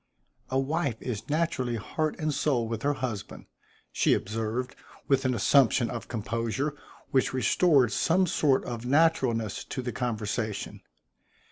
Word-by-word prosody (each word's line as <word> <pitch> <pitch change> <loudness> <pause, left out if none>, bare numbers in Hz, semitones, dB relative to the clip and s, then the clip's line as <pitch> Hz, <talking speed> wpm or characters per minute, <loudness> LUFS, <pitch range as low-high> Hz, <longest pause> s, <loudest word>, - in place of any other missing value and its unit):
"A 130 - 0
wife 140 -3 -1
is 120 -1 -5
naturally 145 -6 0
heart 155 +8 -2
and 155 -2 0
soul 130 -5 +1
with 115 -1 -4
her 145 +1 +1
husband," 110 -7 -5 0.5
she - - +3
observed, 115 +5 -3 0.3
with 135 -1 +2
an 130 -1 +2
assumption 125 -2 +4
of 120 - -6
composure 115 +5 -2 0.4
which 130 -1 +2
restored 130 -1 +3
some 185 +3 +2
sort 145 -5 +2
of 120 -2 -5
naturalness 130 -6 +2
to 130 - -5
the 125 - -3
conversation. 110 -3 -3
125 Hz, 135 wpm, -28 LUFS, 115-145 Hz, 0.5 s, assumption